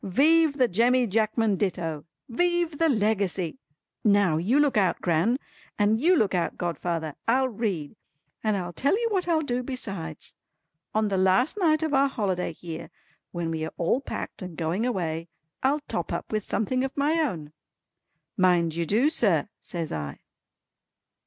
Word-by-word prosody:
Vive 295 - +3
the 255 -2 +4
Jemmy 240 +5 +3
Jackman 220 -1 +1
Ditto! 170 -6 -2 0.2
Vive 345 +3 0
the 330 -1 +4
Legacy! 205 - 0 0.4
Now, 200 -6 +4
you 215 - +2
look 290 -2 +3
out, 190 -5 +2
Gran. 175 +9 +2 0.4
And 215 +2 +2
you 355 +5 +5
look 215 - +2
out, 175 -2 -1
godfather. 170 -3 -2
I'll 260 +3 +3
read! 200 - -3 0.5
And 215 -2 +1
I'll 175 -2 -4
tell 280 - +1
you 470 - +1
what 370 -3 0
I'll 320 -2 +2
do 250 -3 -1
besides. 195 - -5 0.6
On 215 -1 +2
the 195 - 0
last 190 - +3
night 315 -4 +3
of 315 -2 -1
our 275 0 +4
holiday 195 -10 -1
here 165 0 -8 0.4
when 170 -2 -3
we 160 -1 -2
are 160 - -5
all 175 +10 +1
packed - - -6
and 180 -4 -7
going 175 +8 0
away, 165 -7 -2 0.3
I'll 285 +3 +2
top - - -4
up - - -4
with 215 -1 -2
something 255 +4 0
of 270 +1 -4
my 300 +4 +2
own." 160 - -3 0.8
"Mind 175 -3 +3
you 170 -1 -1
do 230 - +3
sir" 205 - +2
says 165 -3 -5
I. 75 -2 -4
210 Hz, 165 wpm, -26 LUFS, 175-265 Hz, 0.8 s, you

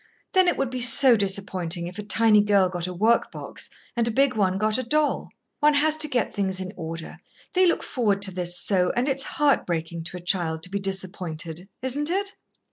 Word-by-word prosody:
Then 375 -2 +4
it - - +2
would 270 -2 -1
be 255 -1 -4
so 250 +1 +8
disappointing 190 -4 -2
if 180 +4 -8
a - - -2
tiny 210 0 +3
girl 200 -3 +3
got 175 -1 -4
a - - -5
work 220 +6 +1
box - - -7 0.3
and 235 -1 +1
a - - +1
big 265 +2 +2
one 190 -3 +1
got 215 +4 0
a - - -2
doll. 300 +4 0 0.3
One 295 0 +4
has 305 +2 +3
to 310 -1 +4
get 250 -6 -1
things 190 -2 -1
in 185 +1 -6
order. 165 -1 -7 0.3
They 370 -1 +4
look 340 - 0
forward 205 -6 -1
to 195 - +3
this 175 -1 -3
so, 180 -3 +1
and 245 +3 0
it's 270 -1 +1 0.2
heart 295 -2 +2
breaking 165 -1 -4
to 180 - -4
a - - -10
child 170 -3 -1
to 180 - -7
be 200 - -2
disappointed, 185 -3 -5
isn't 285 +4 +1
it?" 395 +2 -1
200 Hz, 215 wpm, -24 LUFS, 180-260 Hz, 0.3 s, so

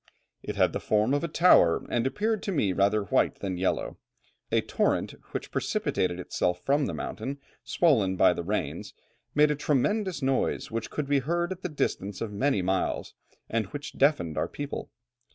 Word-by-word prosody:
"It - - -5
had - - +3
the - - -2
form 110 +4 +1
of 145 - +1
a - - 0
tower, 155 - +5
and 120 +1 0
appeared 215 +7 -1
to 200 - -3
me 105 - +1
rather 100 +2 +2
white 100 - +1
than 95 -2 -4
yellow. 95 - -1 0.5
A - - +3
torrent - - 0 0.2
which - - -5
precipitated 90 -1 -1
itself 90 0 -1
from 140 0 +2
the - - -3
mountain, 140 +2 -4 0.3
swollen 110 - +2
by 90 - +5
the 85 - -4
rains, 85 -5 -3 0.4
made 150 +1 +5
a - - +1
tremendous 150 - 0
noise, 135 -3 0
which 115 -1 -3
could 150 - -3
be 140 0 +2
heard 170 +6 -1
at 190 0 -5
the 180 - -3
distance 100 - -2
of 110 -2 -4
many 105 -2 +1
miles, 95 +1 -1 0.3
and 110 -3 -1
which 145 +6 -7
deafened 135 - +2
our - - 0
people. 145 -1 -5
130 Hz, 180 wpm, -28 LUFS, 100-150 Hz, 0.5 s, tower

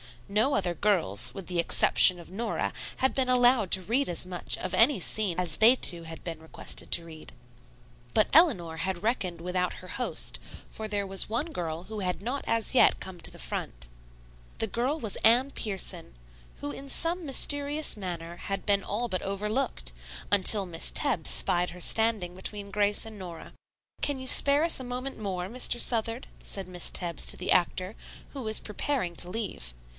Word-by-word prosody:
No 215 +8 +1
other 180 -3 -1
girls, 130 - 0
with 185 +5 -9
the 180 -2 -2
exception 175 +1 +4
of 170 0 -13
Nora, 225 +5 -3 0.3
had 265 0 +1
been 265 -1 0
allowed 245 -4 +3
to 190 - +6
read 240 +9 0
as 175 +1 -3
much 180 -1 -2
of 185 0 -5
any 230 +6 +4
scene 190 -1 +2
as 175 -4 +1
they 230 +4 +6
two 175 -9 +2
had 165 0 -10
been 165 -2 -6
requested 160 0 -3
to 170 - +3
read. 160 -2 -12 0.8
But 215 - +4
Eleanor 195 - +4
had 185 +1 -3
reckoned 185 -7 -2
without 180 +1 -2
her 185 - -12
host, 250 - -2 0.3
for 220 - -6
there 205 -1 -2
was 195 +1 +5
one 235 +8 -2
girl 165 - -5
who 215 +2 -8
had 180 -3 -3
not 250 +6 -4
as 230 +2 -1
yet 260 - +4
come 185 -2 -9
to 165 - +1
the - - -13
front. - - -5 0.7
The 225 - 0
girl 250 +9 -2
was 220 -7 -3
Anne 245 +5 +3
Pierson, 190 - -2 0.5
who 145 - -4
in 275 - -9
some 335 +4 +2
mysterious 285 0 +4
manner 175 -3 -6
had 195 0 -5
been 200 -1 +1
all 235 +4 -3
but 185 - -2
overlooked, 210 - -2 0.4
until 200 0 +5
Miss 165 -2 +1
Tebbs 245 - +2
spied 175 0 +1
her 180 +1 -9
standing 220 -4 0
between 200 +1 -6
Grace 205 +1 0
and 220 -2 -11
Nora. 175 -3 -9 0.5
"Can 285 -2 0
you 260 0 -9
spare 280 +3 +5
us 335 -4 +3
a 260 - -7
moment 250 +2 -5
more, 185 -4 -4
Mr. 240 +1 +1
Southard?" 230 +1 -1 0.2
said 195 -2 -7
Miss 180 -1 0
Tebbs 170 -4 -1
to - - 0
the 180 - -1
actor, 185 +2 +1 0.3
who 275 - -8
was 220 -2 +3
preparing 210 -3 -3
to 175 - +1
leave. 180 - -6
200 Hz, 185 wpm, -27 LUFS, 175-240 Hz, 0.8 s, to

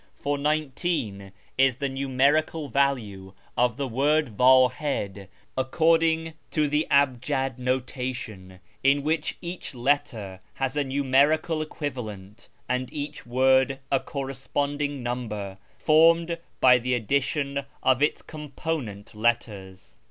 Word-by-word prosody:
For 145 0 -1
19 140 - -2 0.3
is 135 -2 +4
the 140 +2 -2
numerical 140 +3 +1
value 110 -8 -1 0.2
of 120 -1 +1
the 140 -1 -2
word 140 0 +1
Wdhid 125 -5 +3 0.3
according 160 +4 +2 0.2
to 150 -1 +1
tlie 150 +2 0
cibjad 135 -1 +1
notation, 125 -7 -4 0.2
in 140 +1 +3
which 155 +1 -1
each 175 -4 -6
letter 120 -7 -1 0.2
has 135 +1 -2
a 145 - +1
numerical 140 +4 +2
equivalent, 115 -9 -6 0.2
and 125 0 -2
each 145 -2 -6
word 130 +2 +3
a 135 - +3
corresponding 140 +1 -3
number, 105 -6 -4 0.2
formed 165 +4 +4 0.2
by 125 -1 +6
the 125 +1 0
addition 140 +4 -1 0.2
of 130 0 +3
its 150 - +1
component 145 -8 -5
letters. 105 - -2
135 Hz, 110 wpm, -26 LUFS, 120-145 Hz, 0.3 s, by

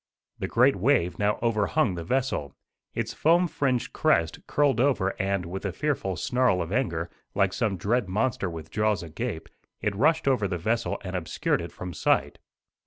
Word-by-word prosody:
The - - -2
great 125 +4 +4
wave 100 -4 +1
now 105 +1 +2
overhung 115 +2 +2
the 85 -1 -5
vessel. 125 - -1 0.4
Its - - -2
foam 170 +3 +3
fringed 130 -6 -1
crest 85 -1 +2
curled 140 -5 +2
over 125 -8 +2
and, 95 -2 -1
with 95 +3 -5
a 100 - -1
fearful 110 -6 -1
snarl 125 -5 +1
of 85 0 -3
anger, 85 - -1 0.2
like 100 -1 +2
some 100 -2 0
dread 105 +4 0
monster 105 -1 0
with 80 -1 -8
jaws 105 -3 +1
agape, 80 -2 -5 0.3
it 105 -1 -1
rushed 155 +7 +2
over 125 -7 +2
the 90 -1 -2
vessel 110 +7 -1
and 95 -1 -5
obscured 90 -3 -1
it - - -7
from 90 -1 -7
sight. - - +1
105 Hz, 175 wpm, -26 LUFS, 90-130 Hz, 0.4 s, great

